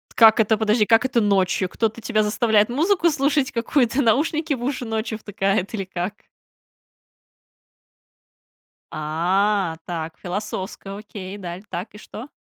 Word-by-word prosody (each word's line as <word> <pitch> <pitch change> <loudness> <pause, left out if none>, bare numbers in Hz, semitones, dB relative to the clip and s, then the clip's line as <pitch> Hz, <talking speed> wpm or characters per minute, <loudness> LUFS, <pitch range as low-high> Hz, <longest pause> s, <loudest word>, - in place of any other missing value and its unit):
Как 225 -1 +7
это, 220 0 +3
подожди, 215 0 +2
как 225 +3 +4
это 250 -3 +2
ночью? 190 -2 +1
Кто-то 225 +2 -2
тебя 215 0 +1
заставляет 215 0 +2
музыку 340 +6 +2
слушать 285 -2 +1
какую-то, 245 +2 +1
наушники 300 +6 +1
в 245 - -5
уши 255 -1 -2
ночью 220 0 -3
втыкают 200 -1 -1
или 195 -4 -3
как? 180 +2 -4 2.8
А, 175 +4 0
так, 165 -2 -5
философско, 195 +1 -5
окей, 205 -2 -8
и - - -8
дал 180 -2 -7
так, 180 +5 -5
и - - -11
что? 220 +4 -9
215 Hz, 135 wpm, -22 LUFS, 195-240 Hz, 2.8 s, Как